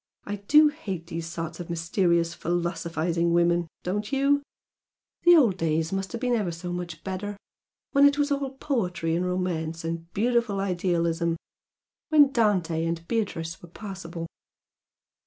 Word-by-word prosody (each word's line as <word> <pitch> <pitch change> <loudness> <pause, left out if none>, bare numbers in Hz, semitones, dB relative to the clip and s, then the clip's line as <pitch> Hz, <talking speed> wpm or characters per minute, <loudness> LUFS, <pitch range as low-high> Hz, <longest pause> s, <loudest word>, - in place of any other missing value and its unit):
"I 205 0 -3
do 300 +10 +6
hate 195 - -6
these 165 -1 -5
sorts 165 -1 -5
of 175 - -7
mysterious, 170 0 +1
philosophising 170 0 -1
women, 170 0 +3 0.2
don't 205 +3 -2
you? 280 +1 +3 0.8
The 350 0 +9
old 235 - +4
days 160 0 0
must 195 0 -2
have 235 - -3
been 250 -1 +1
ever 210 -6 +1
so 175 +2 -5
much 175 -3 -6
better! 200 +2 -4 0.5
When 280 0 +7
it 285 0 +2
was 290 0 +1
all 280 -1 0
poetry 195 - -1
and 180 +2 0
romance 165 -3 -2
and 165 +1 -4
beautiful 235 -2 +1
idealism! 170 -3 0 0.7
When 295 -3 +6
Dante 185 -9 +2
and 165 0 -3
Beatrice 170 -7 -2
were 175 - -12
possible!" 175 -3 -7
180 Hz, 145 wpm, -26 LUFS, 170-215 Hz, 0.8 s, The